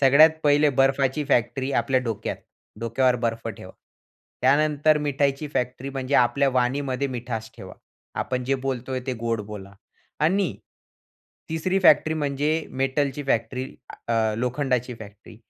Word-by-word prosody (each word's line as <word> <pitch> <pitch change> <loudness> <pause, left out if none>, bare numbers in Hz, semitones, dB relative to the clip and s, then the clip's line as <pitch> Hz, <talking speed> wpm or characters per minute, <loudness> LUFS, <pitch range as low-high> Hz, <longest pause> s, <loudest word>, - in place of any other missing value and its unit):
सगळ्यात 140 +4 +7
पहिले 145 0 +4
बर्फाची 135 +2 +2
फॅक्ट्री 135 +1 0
आपल्या 130 +2 +1
डोक्यात, 115 -4 -3 0.4
डोक्यावर 125 +2 +2
बर्फ 115 0 -2
ठेवा. - - -9 0.7
त्यानंतर 150 +2 +3
मिठाईची 140 0 0
फॅक्टरी 125 +2 -2
म्हणजे 135 0 -3
आपल्या 130 +3 +4
वाणीमध्ये 130 +2 0
मिठास 115 -3 -5
ठेवा, - - -10 0.4
आपण 125 0 -2
जे 135 +2 +1
बोलतोय 130 0 -2
ते 130 - -1
गोड 115 -2 -1
बोला 100 -2 -9 0.5
आणि 185 +5 +2 1.0
3री 185 +4 0
फॅक्टरी 160 -2 +5
म्हणजे 150 +2 -1
मेटलची 135 +1 -1
फॅक्टरी, 125 0 -1 0.4
आ 110 -2 +2
अ, - - -3
लोखंडाची 125 0 -1
फॅक्टरी, 105 -1 -13
130 Hz, 130 wpm, -24 LUFS, 120-145 Hz, 1.0 s, सगळ्यात